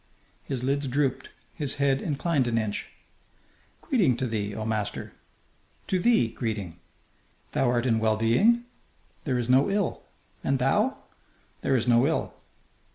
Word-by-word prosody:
His 130 -3 -4
lids 140 +2 0
drooped; 135 0 -1 0.2
his 145 -5 -1
head 140 -1 +1
inclined 145 -2 0
an 115 -1 0
inch. 110 -2 -2 1.0
"Greeting 190 - +2
to 130 - -1
thee, 105 -3 -3
oh, 110 - -4
master!" 110 -2 -3 0.7
"To 185 - 0
thee, 230 - +3
greeting!" 105 -7 -4 0.7
"Thou 130 - +1
art 120 0 +1
in 115 -3 +2
well 110 -1 +2
being?" 205 - +3 0.6
"There 130 -5 0
is 120 -1 -2
no 130 +7 +4
ill. 200 -5 -1 0.4
And 135 - +1
thou?" 205 - +1 0.6
"There 135 - +1
is 120 - -2
no 120 +2 +5
ill. 160 - -1
130 Hz, 145 wpm, -27 LUFS, 115-145 Hz, 1.0 s, no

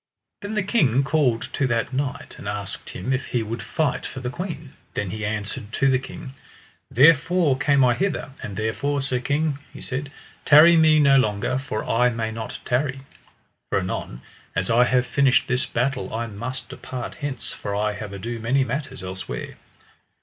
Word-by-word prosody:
Then 205 +1 -4
the 210 - +1
king 140 - +3
called 135 -5 +2
to 135 - +1
that 120 +1 -1
knight, 135 0 -3
and - - -8
asked 100 -1 -5
him 130 - -3
if 130 - -1
he 120 -2 0
would 115 +2 -4
fight 155 -5 -1
for - - -6
the 125 -1 -4
queen. 155 -3 -6 0.2
Then 100 -3 -2
he 110 +2 -5
answered 105 0 -3
to 135 -1 +3
the 130 - +3
king: 130 0 -9 0.6
Therefore 155 +2 +5
came 140 -1 +3
I 120 - +4
hither, 190 -3 -2
and 105 -7 -6
therefore, 115 +6 -1
sir 130 -2 0
king, 145 +2 0
he - - -11
said, 140 +2 -4 0.3
tarry 160 +3 +8
me 160 -1 +6
no 140 -2 +6
longer, 110 +2 0
for 125 -5 -4
I 125 +2 +3
may 115 -1 -2
not 110 0 -5
tarry. 130 +2 0 0.7
For - - +1
anon - - -4 0.3
as 95 +3 0
I 120 +2 +5
have 125 0 +2
finished 135 -1 +3
this 125 0 +1
battle 125 -5 -1
I 115 +1 -2
must 115 +4 -6
depart 125 -2 -6
hence, 145 -2 -4
for 100 - -4
I 105 +1 0
have 105 0 -7
ado 115 +4 -5
many 130 +5 +2
matters 135 -3 -4
elsewhere. 95 -9 -5
130 Hz, 180 wpm, -23 LUFS, 110-140 Hz, 0.7 s, tarry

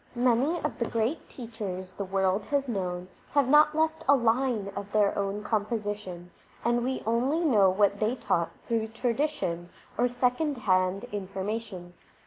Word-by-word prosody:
Many 250 +7 +2
of 300 - -3
the 235 - 0
great 230 +7 -1
teachers 205 -6 -6
the 200 - -4
world 190 +1 0
has 280 -1 0
known 180 -5 -3 0.3
have 280 -3 +3
not 300 +2 +6
left 320 0 +1
a 285 - +8
line 235 -4 +1
of 200 0 -6
their 210 -2 +3
own 200 +1 -2
composition, 205 -5 -3 0.3
and 240 0 +2
we 260 +1 -2
only 245 +8 +1
know 215 - +5
what 200 +1 +2
they 220 +3 +1
taught 170 -8 0
through 225 -1 -1
tradition 235 - -2 0.3
or 245 - +4
second 250 +4 0
hand 185 -2 +1
informa 200 +2 -3
tion. 180 -5 -10
225 Hz, 155 wpm, -28 LUFS, 195-250 Hz, 0.3 s, a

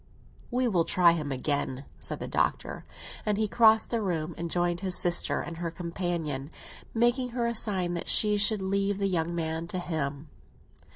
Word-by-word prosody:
"We 250 0 +1
will 180 -7 +2
try 175 0 +5
him 155 -4 -2
again," 135 0 -2
said - - -2
the - - -5
Doctor. - - -1 0.4
And 210 -1 0
he 215 0 +1
crossed 220 0 +5
the 230 -2 0
room 170 -4 -2
and 170 0 -4
joined 175 0 0
his 185 -1 +1
sister 175 -1 +1
and 170 -1 -7
her 170 0 -3
companion, 170 -5 -3 0.5
making 240 +2 +2
her 235 - +1
a 235 - 0
sign 190 -6 -2
that 170 - -3
she 210 -1 +4
should 210 -1 +4
leave 200 +1 0
the 200 - -1
young 170 -2 -1
man 160 0 -2
to 185 - -4
him. 150 -4 -3
175 Hz, 180 wpm, -28 LUFS, 165-210 Hz, 0.5 s, try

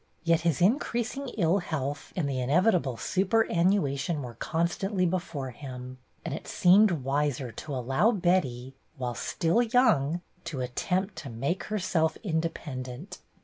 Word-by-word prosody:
Y 165 - +4
et 165 - +2
his 165 -4 +1
increasing 240 +4 0
ill 180 0 +3
health 145 -5 -4
and 170 -6 0
the 135 -2 -1
inevitable 145 - +2
superannuation 175 - +1
were 120 -2 -7
con 165 +7 0
stantly 185 +1 0
before 165 -7 -3
him, 130 0 -8 0.3
and 165 - -3
it 155 - -6
seemed 195 +4 +5 0.2
wiser 135 -3 0
to 140 +6 -6
allow 135 - +2
Betty, 175 - 0 0.2
while 125 -2 -2
still 165 - +1
young, 175 - +3 0.2
to 140 - -4
attempt 180 - -1
to 140 - -6
make 135 +11 -2
herself 175 -6 0
independent. 160 - -4
160 Hz, 140 wpm, -28 LUFS, 135-185 Hz, 0.3 s, seemed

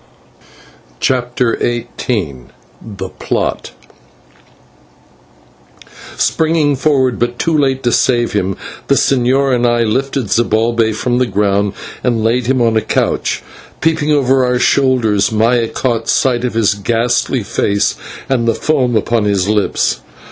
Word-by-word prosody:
CHAPTER 125 - 0
XVIII 115 - -3 0.4
THE 95 -3 -7
PLOT - - -3 2.5
Springing 160 -3 +1
forward, 130 -3 +1
but 120 0 -1
too 165 +4 0
late 135 -3 +1
to 120 - +1
save 120 -1 +2
him, 95 -2 -1 0.3
the 140 - +3
señor 135 +1 +2
and 120 0 +1
I 120 0 +2
lifted 130 0 -1
Zibalbay 115 0 +1
from 120 +3 -1
the 125 - +1
ground 100 0 0 0.3
and 120 -3 0
laid 115 +2 +1
him 130 -2 +2
on 115 -1 +2
a - - +2
couch. - - -1 0.4
Peeping 155 -2 0
over 135 -2 +3
our 125 0 +1
shoulders, 125 -7 +2
Maya 115 +2 +2
caught 115 -1 -2
sight 125 -2 +1
of 120 - -3
his 110 -3 +2
ghastly 120 +4 0
face 100 +1 0 0.3
and 125 -3 0
the 115 - +2
foam 130 -6 0
upon 110 0 +1
his 100 -2 +1
lips. 105 -10 0
120 Hz, 130 wpm, -15 LUFS, 110-130 Hz, 2.5 s, the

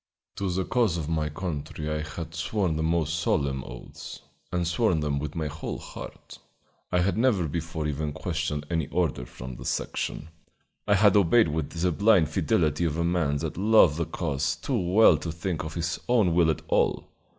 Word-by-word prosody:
To 100 -1 -1
the 90 +1 -1
cause 115 -9 +1
of 80 -2 -4
my 80 -2 0
country 75 -2 -5
I 75 0 -1
had 80 +2 -7
sworn 85 0 -1
the 80 - -1
most 80 0 0
solemn 70 -5 0
oaths, - - -9 0.3
and 90 -1 0
sworn 90 0 +2
them 75 -2 -1
with 75 0 -5
my 80 -2 -2
whole 75 +2 -5
heart. - - -10 0.5
I 90 - +3
had 100 +4 +1
never 110 -9 +2
before 80 +1 -4
even 75 0 -2
questioned 80 -2 -3
any 80 -4 0
order 75 -9 -1
from 60 0 -8
the - - -9
Section. 80 - -3 0.6
I 105 - +4
had 105 0 +5
obeyed 100 0 +5
with 75 -1 -2
the 85 +2 0
blind 100 -3 +4
fidelity 80 -1 +1
of 80 -1 -1
a 85 - +1
man 85 -4 +1
that 80 - -5
loved 100 -6 +5
the 85 - 0
cause 75 +5 -1
too 140 - -4
well 95 -3 +5
to 80 +2 -4
think 80 -1 -3
of 80 0 -6
his 85 -1 -2
own 110 -8 +4
will 85 -1 +4
at 80 - -1
all. - - +1
80 Hz, 190 wpm, -27 LUFS, 75-90 Hz, 0.6 s, had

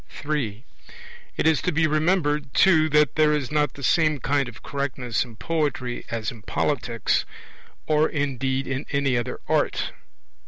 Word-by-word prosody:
(3) 130 -7 -3 0.7
It - - 0
is 160 -2 +4
to 180 - 0
be 160 0 +2
remembered, 150 -3 +1
too, 160 -4 +5
that 150 -2 +4
there 155 -1 +3
is 145 -3 -2
not 150 -1 +1
the 140 - -9
same 155 +1 +3
kind 135 +1 0
of 115 - -14
correctness 135 -4 -2
in 120 -3 -13
poetry 145 -4 -2
as 115 -1 -2
in 115 -4 -12
politics, 115 0 0 0.6
or 155 0 +3
indeed 135 -1 -2
any 140 -2 +1
other 120 -1 -2
art. - - 0
145 Hz, 150 wpm, -24 LUFS, 125-155 Hz, 0.7 s, too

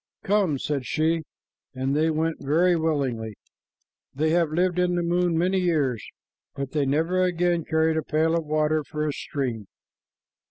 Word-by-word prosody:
"Come," 195 -7 +2
said 140 -2 -3
she, 160 +1 +1 0.5
and 135 +2 -1
they 155 +2 +2
went 160 0 -1
very 170 +6 +3
willingly. 135 -9 -1 0.8
They 155 +3 +1
have 170 -1 +2
lived 180 +3 +1
in 180 0 +2
the 175 - 0
moon 175 0 +1
many 185 +3 +2
years, 145 - 0 0.5
but 140 -1 -4
they 145 -3 0
never 165 +6 +1
again 175 -2 +1
carried 160 0 +1
a - - +1
pail 160 +2 +1
of 165 - 0
water 155 0 +1
for 150 +1 -4
a 150 - -1
stream. 120 -10 -4
160 Hz, 160 wpm, -25 LUFS, 145-175 Hz, 0.8 s, very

